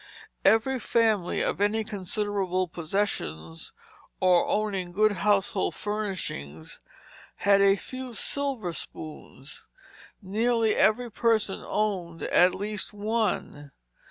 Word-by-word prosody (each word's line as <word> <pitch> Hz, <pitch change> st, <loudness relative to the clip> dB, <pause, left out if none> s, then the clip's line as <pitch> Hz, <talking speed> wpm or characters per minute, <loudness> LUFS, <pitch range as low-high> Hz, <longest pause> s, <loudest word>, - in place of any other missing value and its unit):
Every 255 Hz, +4 st, +3 dB
family 220 Hz, -7 st, +1 dB
of -, -, -1 dB
any 215 Hz, +2 st, +2 dB
considerable 200 Hz, -2 st, -1 dB
possessions 155 Hz, -, -3 dB, 0.5 s
or 180 Hz, -2 st, +4 dB
owning 195 Hz, -4 st, -1 dB
good 215 Hz, +3 st, +4 dB
household 200 Hz, 0 st, +1 dB
furnishings 185 Hz, -, -4 dB, 0.6 s
had 200 Hz, -1 st, +3 dB
a 195 Hz, 0 st, +5 dB
few 255 Hz, +3 st, -8 dB
silver 260 Hz, -7 st, -1 dB
spoons; 150 Hz, -4 st, -8 dB, 0.5 s
nearly 225 Hz, +2 st, +1 dB
every 235 Hz, +2 st, +3 dB
person 220 Hz, -3 st, +1 dB
owned 185 Hz, -6 st, -2 dB
at 180 Hz, +1 st, +4 dB
least 210 Hz, +1 st, -2 dB
one. 205 Hz, -9 st, -2 dB
205 Hz, 100 wpm, -27 LUFS, 180-220 Hz, 0.6 s, a